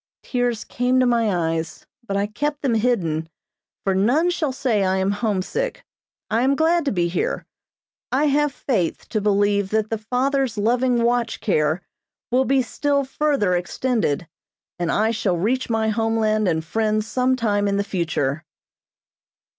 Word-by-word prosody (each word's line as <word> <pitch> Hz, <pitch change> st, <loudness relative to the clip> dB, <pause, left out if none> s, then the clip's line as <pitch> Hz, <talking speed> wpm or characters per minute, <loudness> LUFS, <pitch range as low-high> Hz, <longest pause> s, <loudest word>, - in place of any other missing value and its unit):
Tears 245 Hz, -3 st, -1 dB
came 250 Hz, +1 st, +1 dB
to 255 Hz, -, +4 dB
my 210 Hz, -9 st, +1 dB
eyes, 160 Hz, -1 st, -5 dB, 0.2 s
but 200 Hz, -4 st, -2 dB
I 200 Hz, -, +1 dB
kept 290 Hz, +8 st, -3 dB
them 265 Hz, -4 st, +2 dB
hidden, 175 Hz, -9 st, 0 dB, 0.5 s
for 195 Hz, -, +1 dB
none 255 Hz, -, +2 dB
shall 310 Hz, -5 st, -1 dB
say 245 Hz, -6 st, 0 dB
I 190 Hz, 0 st, +1 dB
am 190 Hz, +1 st, +1 dB
homesick; 205 Hz, -, -2 dB, 0.4 s
I 225 Hz, -, +1 dB
am 270 Hz, +2 st, +3 dB
glad 330 Hz, +2 st, +2 dB
to 275 Hz, -, +1 dB
be 175 Hz, -3 st, +1 dB
here. 450 Hz, -, -2 dB, 0.7 s
I 275 Hz, +4 st, +2 dB
have 295 Hz, 0 st, +2 dB
faith 210 Hz, -, -2 dB
to 215 Hz, -, -1 dB
believe 205 Hz, -1 st, +2 dB
that 215 Hz, 0 st, 0 dB
the 225 Hz, -, -1 dB
Father's 255 Hz, +1 st, 0 dB
loving 240 Hz, +3 st, +2 dB
watch 235 Hz, -1 st, 0 dB
care 155 Hz, -2 st, +1 dB, 0.5 s
will 260 Hz, +2 st, +3 dB
be 270 Hz, 0 st, +2 dB
still 285 Hz, +2 st, 0 dB
further 270 Hz, -8 st, +1 dB
extended, 180 Hz, -, -1 dB, 0.5 s
and 175 Hz, -1 st, 0 dB
I 220 Hz, +2 st, +2 dB
shall 200 Hz, -5 st, 0 dB
reach 245 Hz, +9 st, 0 dB
my 220 Hz, -1 st, +1 dB
homeland 215 Hz, -1 st, +1 dB
and 160 Hz, -2 st, 0 dB
friends 215 Hz, +3 st, 0 dB
some 255 Hz, +3 st, +1 dB
time 205 Hz, -4 st, 0 dB
in 200 Hz, 0 st, +1 dB
the 200 Hz, -, +1 dB
future. 160 Hz, -6 st, -1 dB
220 Hz, 160 wpm, -22 LUFS, 195-255 Hz, 0.7 s, to